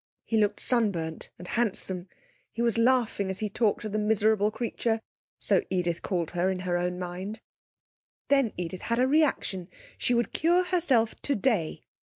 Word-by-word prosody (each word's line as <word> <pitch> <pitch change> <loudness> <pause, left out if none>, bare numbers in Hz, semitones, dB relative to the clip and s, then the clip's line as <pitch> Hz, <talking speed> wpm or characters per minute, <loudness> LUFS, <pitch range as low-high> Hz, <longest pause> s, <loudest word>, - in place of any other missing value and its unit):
He 225 - -1
looked 210 -1 +2
sunburnt 195 -10 0
and 180 - -10
handsome. 190 -5 -1 0.4
He 235 - -2
was 235 -1 +2
laughing 230 -5 +2
as 190 - -2
he 215 - -2
talked 215 0 +1
to 215 - -4
the 215 +1 -1
miserable 210 0 +3
creature 225 0 -1 0.4
(so - - +3
Edith 175 -2 -1
called 175 -5 -2
her 175 +1 +1
in 185 -1 -2
her 180 -1 -1
own 180 0 -1
mind). 185 +4 -5 0.9
Then 275 -5 +3
Edith 180 +1 -4
had 235 - -1
a 255 +1 +3
reaction. 270 - +1 0.3
She 245 - +2
would 235 0 0
cure 345 +3 +3
herself 285 -12 +2
today! 225 - 0
215 Hz, 165 wpm, -28 LUFS, 180-235 Hz, 0.9 s, miserable